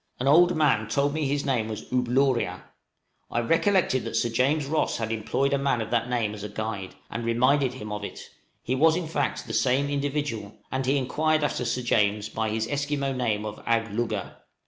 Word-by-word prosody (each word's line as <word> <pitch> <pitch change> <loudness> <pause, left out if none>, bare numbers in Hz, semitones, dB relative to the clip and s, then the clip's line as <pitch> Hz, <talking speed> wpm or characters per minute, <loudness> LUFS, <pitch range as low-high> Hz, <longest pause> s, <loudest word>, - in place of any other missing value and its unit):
An 130 - -1
old 175 +5 +6
man 130 -9 +3
told 140 +6 +1
me 155 -2 0
his 140 +1 -1
name 125 -6 0
was 110 -1 -5
"Ooblooria:" 125 0 +1 0.7
I - - 0
recollected 165 - +2
that 115 - -4
Sir 120 - +1
James 140 +6 +1
Ross 155 +3 0
had 115 -1 -3
employed 115 +6 0
a 140 - +2
man 135 -3 +1
of 110 - -4
that 120 0 +1
name 115 -4 0
as 105 -1 -8
a 105 - -5
guide, 105 -2 -5 0.2
and 115 - -4
reminded 130 +3 +2
him 105 -4 -7
of 105 0 -4
it; - - -8 0.3
he 125 - -1
was, 160 +4 +4
in 175 -1 -2
fact, 145 -3 -2
the - - -6
same 135 +2 +2
individual, 140 -7 -2
and 130 0 -1
he 140 +2 +3
inquired 155 +4 +1
after 135 -4 -1
Sir 125 +2 -1
James 105 -2 +1
by 110 0 -2
his 110 +1 -1
Esquimaux 145 -1 -1
name 110 -5 -1
of 105 0 -7
"Agglugga." 115 0 -1
125 Hz, 200 wpm, -26 LUFS, 110-145 Hz, 0.7 s, old